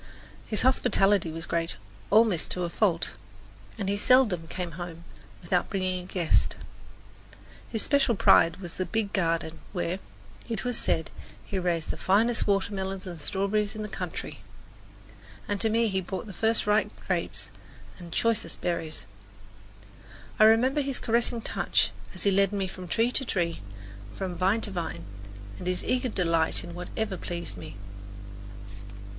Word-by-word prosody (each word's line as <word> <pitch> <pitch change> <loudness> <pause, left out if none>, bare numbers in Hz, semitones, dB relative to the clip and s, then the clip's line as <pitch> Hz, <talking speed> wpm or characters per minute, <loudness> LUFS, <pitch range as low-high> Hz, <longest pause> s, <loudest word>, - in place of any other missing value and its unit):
His 215 - +1
hospitality 200 -8 +3
was 165 +1 -5
great, 165 -5 0 0.3
almost 215 -5 +4
to 180 - -2
a 175 - -1
fault, 175 -5 +1 0.7
and 200 -3 -3
he 200 +1 +1
seldom 210 -8 +4
came 180 0 -4
home 170 0 -7 0.4
without 175 +1 +1
bringing 185 -2 -1
a - - -12
guest. 175 -4 +1 1.1
His 220 -3 -1
special 280 -5 +3
pride 165 -3 +5
was 175 -4 -8
the 185 - 0
big 220 -2 -1
garden 165 -3 0
where, 180 0 -1 0.5
it 225 - -2
was 245 -1 0
said, 160 - 0 0.3
he 195 - -2
raised 170 -3 0
the - - -7
finest 225 +5 +2
watermelons 195 -1 -1
and 175 -3 -7
strawberries 200 +6 0
in 215 - -4
the - - -3
county; - - -5 1.1
and 205 -1 -1
to 225 - +4
me 230 +1 +3
he 190 -2 0
brought 185 +2 -5
the 205 - -8
first 225 +4 +2
ripe 210 +1 +3 0.2
grapes - - -2 0.5
and 175 -1 -9
the - - -5
choicest 230 -2 +1
berries. 165 -3 -2 1.3
I 215 - +8
remember 250 +6 +5
his 275 -2 -1
caressing 235 0 +1
touch - - +1 0.2
as 185 - -1
he 200 - +4
led 195 0 +3
me 200 -2 -1
from 185 -1 -8
tree 230 +6 +2
to 265 - +1
tree, 170 - -1 0.5
from 190 -2 -3
vine 190 +6 +2
to 210 - -3
vine, 165 - -4 0.6
and 180 - -6
his 180 0 0
eager 255 0 0
delight 165 -5 +2
in 175 -1 -8
whatever 190 +3 -3
pleased 170 - -5
me. 90 - -9
190 Hz, 155 wpm, -28 LUFS, 175-220 Hz, 1.3 s, I